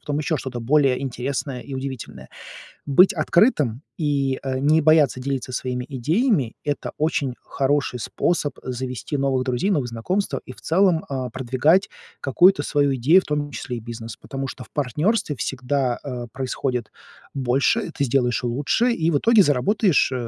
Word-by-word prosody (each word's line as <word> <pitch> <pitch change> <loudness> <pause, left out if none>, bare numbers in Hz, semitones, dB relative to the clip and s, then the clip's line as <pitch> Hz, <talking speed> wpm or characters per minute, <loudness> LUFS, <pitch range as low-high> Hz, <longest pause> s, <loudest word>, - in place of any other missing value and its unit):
потом 145 0 -2
ещё 155 0 -1
что-то 130 -2 -5
более 135 +1 +2
интересное 130 0 -3
и 140 - -8
удивительное. 130 -2 -6 0.6
Быть 165 +7 +5
открытым 155 - +2 0.2
и, 140 -4 0
э, 130 -1 -2
не 155 +3 +3
бояться 150 -4 +4
делиться 130 -1 -3
своими 125 0 -3
идеями- 150 - 0
это 145 -1 -3
очень 145 -4 0
хороший 135 -2 -1
способ 150 +3 -1
завести 130 +1 -4
новых 135 -2 +1
друзей, 130 +9 -1
новые 145 -10 +1
знакомства 180 - -2
и 125 - -9
в - - -18
целом, 175 -1 +2
э, 130 -2 -3
продвигать 130 - +2 0.3
какую-то 145 +3 +4
свою 145 -2 +1
идею, 155 +10 +5
в - - -17
том 145 -1 -2
числе 125 -3 -5
и - - -5
бизнес, 115 0 -8
потому 135 0 -5
что 130 - -8
в - - -20
партнерстве 150 - 0
всегда, 125 +1 -1
э, 125 -4 -5
происходит 130 -2 -3 0.4
больше, 135 +4 +1
ты 140 - -2
сделаешь 125 -1 +1
лучше, 145 - +1
и 165 -6 +1
в 145 - +3
итоге, 230 +9 +2
э, - - +6
заработаешь 170 - +2
135 Hz, 160 wpm, -22 LUFS, 125-155 Hz, 0.6 s, э